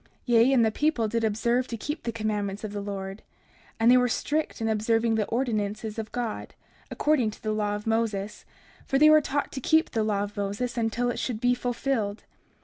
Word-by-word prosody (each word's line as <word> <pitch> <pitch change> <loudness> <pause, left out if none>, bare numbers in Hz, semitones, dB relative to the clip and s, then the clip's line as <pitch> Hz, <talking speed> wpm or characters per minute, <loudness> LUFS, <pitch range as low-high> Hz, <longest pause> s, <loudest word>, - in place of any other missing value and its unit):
30:3 - - -31 0.2
Yea, 240 +2 +4
and 240 -4 +5
the 220 - +2
people 275 -3 +1
did 230 +1 -1
observe 235 +4 +1
to 230 - -5
keep 295 +8 -4
the 235 - -3
commandments 210 -2 -3
of 215 - -4
the 205 - -3
Lord; 195 0 -5 0.6
and 230 +2 +5
they 255 - +7
were 250 0 +3
strict 305 +5 -1
in 225 - -1
observing 225 +1 +1
the 220 -2 0
ordinances 215 -3 -2
of 220 -1 -5
God, 240 -3 -4 0.3
according 295 -7 +1
to 210 - -12
the 215 - -1
law 210 -1 -1
of 210 - -7
Moses; 220 -3 -1 0.4
for 270 - +2
they 305 +2 +7
were 310 0 +7
taught 285 0 -2
to 265 - -5
keep 320 +5 +3
the 225 - 0
law 205 -2 0
of 205 0 -7
Moses 205 +5 -3
until 240 +1 0
it - - -5
should 235 -4 -2
be 245 +1 +3
fulfilled. 245 -4 -2
225 Hz, 215 wpm, -27 LUFS, 210-245 Hz, 0.6 s, they